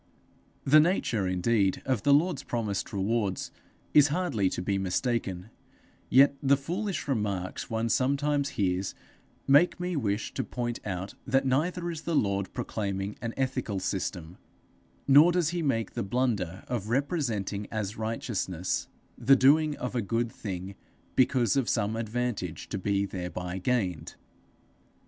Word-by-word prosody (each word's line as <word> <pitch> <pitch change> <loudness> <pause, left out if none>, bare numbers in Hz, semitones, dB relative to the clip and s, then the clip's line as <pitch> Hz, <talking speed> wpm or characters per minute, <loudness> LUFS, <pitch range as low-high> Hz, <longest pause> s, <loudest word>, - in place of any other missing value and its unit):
The 150 +3 +6
nature 150 - +1
indeed 95 +2 +1
of 130 -6 0
the 145 - +3
Lord's 150 0 +3
promised 115 -7 -3
rewards 100 -1 -1 0.4
is 145 -1 +7
hardly 145 - 0
to - - -4
be 100 +2 -1
mistaken; 95 0 -2 0.6
yet 135 +3 +6
the 140 0 +4
foolish 175 +4 -3
remarks 100 -8 -2
one 115 0 -1
sometimes 140 +3 +1
hears, 95 -1 0 0.5
make 145 +7 +5
me 180 0 -2
wish 105 -7 -1
to - - -2
point 120 -1 -4
out 95 0 -4
that 135 +1 +2
neither 170 +6 0
is 160 -2 -6
the 170 -1 -2
Lord 100 -6 0
proclaiming 100 -1 -3
an 115 -1 -4
ethical 130 -6 -1
system, 90 -3 -4 0.7
nor 145 +5 +7
does 175 -3 +1
he 175 0 -2
make 115 -7 0
the - - -3
blunder 100 -5 -1
of 115 -4 -3
representing 120 - -1
as 105 -1 -3
righteousness 110 -5 -2 0.3
the 130 +3 +6
doing 145 +3 +4
of 125 - -4
a 120 - 0
good 115 +3 -1
thing 95 -2 -6 0.4
because 125 -4 +3
of 135 -4 +1
some 110 -1 0
advantage 115 -7 -3
to 100 - -3
be 100 +1 0
thereby 90 -1 -5
gained. 95 -6 -1
115 Hz, 140 wpm, -28 LUFS, 100-140 Hz, 0.7 s, is